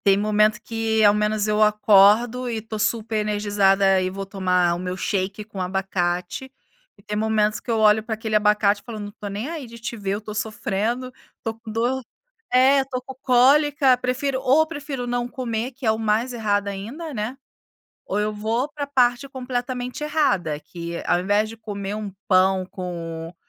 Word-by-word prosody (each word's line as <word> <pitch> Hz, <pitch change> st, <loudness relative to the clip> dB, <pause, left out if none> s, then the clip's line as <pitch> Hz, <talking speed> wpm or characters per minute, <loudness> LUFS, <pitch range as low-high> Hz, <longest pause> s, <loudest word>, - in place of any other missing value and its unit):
Tem 195 Hz, -1 st, +5 dB
momento 215 Hz, +1 st, +2 dB
que 225 Hz, -1 st, 0 dB
ao 205 Hz, -1 st, +7 dB
menos 210 Hz, 0 st, 0 dB
eu 210 Hz, 0 st, +1 dB
acordo 215 Hz, +4 st, +4 dB
e 235 Hz, -, -2 dB
estou 220 Hz, 0 st, -6 dB
super 220 Hz, +1 st, -1 dB
energizada 205 Hz, -2 st, +2 dB
e 185 Hz, -, 0 dB
vou 195 Hz, +1 st, -5 dB
tomar 180 Hz, -3 st, +1 dB
o -, -, -5 dB
meu 180 Hz, 0 st, -4 dB
shake 195 Hz, +2 st, -2 dB
com 205 Hz, -3 st, -7 dB
abacate, 180 Hz, +5 st, -2 dB, 0.5 s
e -, -, -21 dB
tem 210 Hz, -, -4 dB
momentos 215 Hz, 0 st, +1 dB
que -, -, -14 dB
eu 230 Hz, -, +2 dB
olho 215 Hz, 0 st, +5 dB
para 220 Hz, 0 st, -4 dB
aquele 220 Hz, 0 st, -3 dB
abacate 210 Hz, -1 st, +3 dB
e -, -, -34 dB
falo 230 Hz, -3 st, -7 dB
não 205 Hz, 0 st, -5 dB
estou 205 Hz, 0 st, -8 dB
nem 205 Hz, +6 st, -4 dB
aí 315 Hz, -5 st, -6 dB
de 235 Hz, 0 st, -11 dB
te 235 Hz, +1 st, -5 dB
ver, 200 Hz, -2 st, -2 dB
eu -, -, -2 dB
estou 215 Hz, 0 st, -8 dB
sofrendo, 220 Hz, +3 st, -2 dB, 0.2 s
estou 225 Hz, -, -4 dB
com 225 Hz, -1 st, -9 dB
dor, 240 Hz, +4 st, 0 dB, 0.5 s
é, 265 Hz, +2 st, +5 dB
estou 265 Hz, -2 st, -3 dB
com 265 Hz, +1 st, -10 dB
cólica, 270 Hz, +1 st, +4 dB
prefiro 255 Hz, +2 st, -1 dB
ou 300 Hz, +5 st, +4 dB
prefiro 290 Hz, -5 st, -5 dB
não 245 Hz, 0 st, -1 dB
comer, 245 Hz, -1 st, -3 dB
que 255 Hz, 0 st, -7 dB
é -, -, +5 dB
o 220 Hz, -, 0 dB
mais 225 Hz, +3 st, 0 dB
errado 205 Hz, -3 st, 0 dB
ainda, 245 Hz, -, -6 dB
né, 215 Hz, +3 st, -3 dB, 0.7 s
ou 200 Hz, -, -1 dB
eu 210 Hz, 0 st, -1 dB
vou 225 Hz, +6 st, -1 dB
para 290 Hz, -1 st, -3 dB
parte 255 Hz, -1 st, +1 dB
completamente 250 Hz, 0 st, -4 dB
errada, 200 Hz, -, +1 dB
que 170 Hz, +1 st, -7 dB
ao 175 Hz, -, +2 dB
invés 205 Hz, +3 st, +2 dB
de 225 Hz, -, -9 dB
comer 205 Hz, -2 st, -5 dB
1 210 Hz, -2 st, -5 dB, 0.2 s
pão 185 Hz, 0 st, +3 dB
com 170 Hz, -3 st, -6 dB
215 Hz, 190 wpm, -23 LUFS, 200-245 Hz, 0.7 s, ao